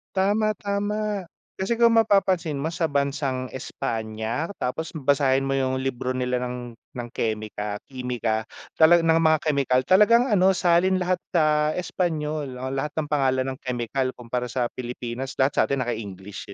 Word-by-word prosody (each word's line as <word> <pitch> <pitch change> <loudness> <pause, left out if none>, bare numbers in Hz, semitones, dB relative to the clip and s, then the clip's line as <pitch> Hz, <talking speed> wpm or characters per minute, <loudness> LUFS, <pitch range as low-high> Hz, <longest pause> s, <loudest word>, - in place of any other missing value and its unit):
Tama, 210 +3 +2
tama 205 -1 -2 0.3
kasi 195 +5 0
kung 235 0 +5
mapapansin 190 -7 +2
mo 160 +3 -2
sa 165 -1 0
bansang 140 -2 -1
Espanya, 110 +2 -3
tapos 160 +6 -4
basahin 135 -2 +2
mo 135 - -2
yung 130 -1 0
libro 130 -1 -2
nila 125 0 0
ng 125 -1 -5 0.2
ng 120 -1 -5
kemik 110 -1 -2 0.4
kimika 120 -4 -2 0.3
talaan 170 +1 +7
ng 165 0 +5
mga 160 -1 +4
kemikal 140 -4 +2
talagang 210 - +5
ano, 190 -1 +4
salin 175 +2 +3
lahat 180 0 0 0.2
sa 165 - +5 0.3
Espanyol 155 -6 -2
o 130 +1 -4
lahat 135 +2 -3
ng 155 -2 -1
pangalan 130 -3 +2
ng 130 - -8
kemikal 130 +1 -2
kumpara 125 0 -3
sa 120 0 -1
Pilipinas 125 +1 -5
lahat 135 +1 +2
sa - - +7
atin 140 -2 0
naka-English, 105 -4 -6
135 Hz, 150 wpm, -24 LUFS, 125-170 Hz, 0.4 s, talaan